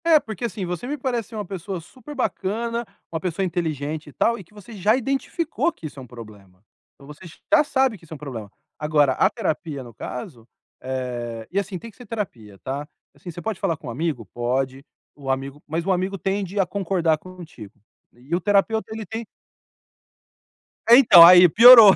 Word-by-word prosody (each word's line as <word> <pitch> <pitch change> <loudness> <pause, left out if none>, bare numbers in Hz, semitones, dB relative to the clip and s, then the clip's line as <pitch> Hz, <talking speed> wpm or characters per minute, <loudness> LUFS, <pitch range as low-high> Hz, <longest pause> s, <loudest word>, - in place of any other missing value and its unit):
É 325 -2 +6
porque, 220 -3 -6
assim, 200 -3 -4
você 180 +7 -5
me 295 +3 -3
parece 245 -5 -2
ser 225 - -10
uma 210 -1 -4
pessoa 190 0 -5
super 255 - -12
bacana, 235 0 -2 0.3
uma 165 - -2
pessoa 180 +2 -2
inteligente, 155 -3 -3
e - - -15
tal, 235 0 +1
e 200 - -10
que 180 - -27
você 210 +3 -12
já 210 +2 +2
identificou 275 +6 -1
que 165 - -13
isso 145 -2 -8
é - - -8
um 125 - -11
problema. 105 -6 -13 0.3
Então, 140 - -17
você 150 +1 -13 0.3
já 310 -1 +7
sabe 265 -6 +1
que 175 - -27
isso 165 - -11
é - - -6
um - - -9
problema. 120 -8 -8 0.3
Agora, 150 -3 +3
a 190 - +3
terapia 160 - -3
no 120 -2 -12
caso, 125 - -8 0.3
eh, 120 -3 -5
e 195 - +1
assim, 195 -1 -4
tem 230 +5 -10
que - - -28
ser 245 -3 -13
terapia, 125 - -6
tá? 140 +3 -4 0.3
Assim, 180 - -11
você 175 +1 -7
pode 220 -2 -4
falar 170 -5 0
com 140 - -11
um - - -4
amigo? 140 -3 -3
Pode! 130 +3 -2 0.3
O 140 -2 -8
amigo 135 +2 -3
mas 165 +2 -2
o 195 - +1
amigo 185 +2 -1
tende 195 +2 -2
a 195 - +4
concordar 175 -4 0
contigo. 165 - -12 0.3
E 130 +8 -4
o 180 - -1
terapeuta 205 +3 +1
ele 220 -1 -5
tem 225 +4 -5 1.7
É 235 - +10
então 210 -10 +9
aí 180 +1 +9
piorou. 230 0 +10
175 Hz, 200 wpm, -23 LUFS, 140-215 Hz, 1.7 s, É